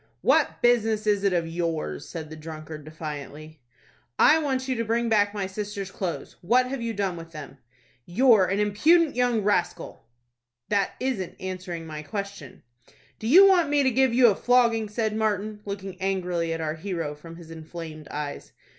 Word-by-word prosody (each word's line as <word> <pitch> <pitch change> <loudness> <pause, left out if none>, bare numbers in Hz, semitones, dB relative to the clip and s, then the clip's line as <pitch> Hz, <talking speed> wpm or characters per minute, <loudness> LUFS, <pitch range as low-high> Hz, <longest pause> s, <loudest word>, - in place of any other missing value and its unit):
"What - - +2
business 225 -3 +3
is 205 -2 +2
it 200 - +3
of 175 -2 +1
yours?" 165 -1 -3
said 160 -3 -7
the - - -7
drunkard, 155 -1 -9
defiantly. 155 -1 -8 0.6
"I 315 - +6
want 265 -4 -1
you 260 - 0
to 230 - 0
bring 230 +1 0
back 205 -2 +3
my 205 -2 -3
sister's 200 0 -5
clothes. 180 -4 -5
What 245 +8 +3
have 270 -2 -4
you 230 0 -2
done 195 -4 -2
with 165 0 -10
them?" 145 -3 -9 0.5
"You're 220 +1 +5
an 195 +2 -1
impudent 295 +11 +3
young 245 -3 +1
rascal." 195 - -1 0.6
"That 200 -2 +1
isn't 245 -9 -3
answering 185 -3 -5
my 155 -1 -6
question." 200 - -7 0.6
"Do 220 - -4
you 365 +11 +8
want 360 -6 +4
me 290 -1 +3
to 260 - +3
give 260 +1 +3
you 245 +1 +5
a 200 - +1
flogging?" 235 -2 +3
asked 220 -2 +1
Martin, 215 -1 -1
looking 195 -2 -6
angrily 180 -3 -1
at 165 0 -3
our 155 -1 -1
hero 165 -3 -4
from 165 +3 -12
his 165 -1 -12
inflamed 160 -1 -9
eyes. 145 -1 -6
195 Hz, 175 wpm, -25 LUFS, 165-230 Hz, 0.6 s, you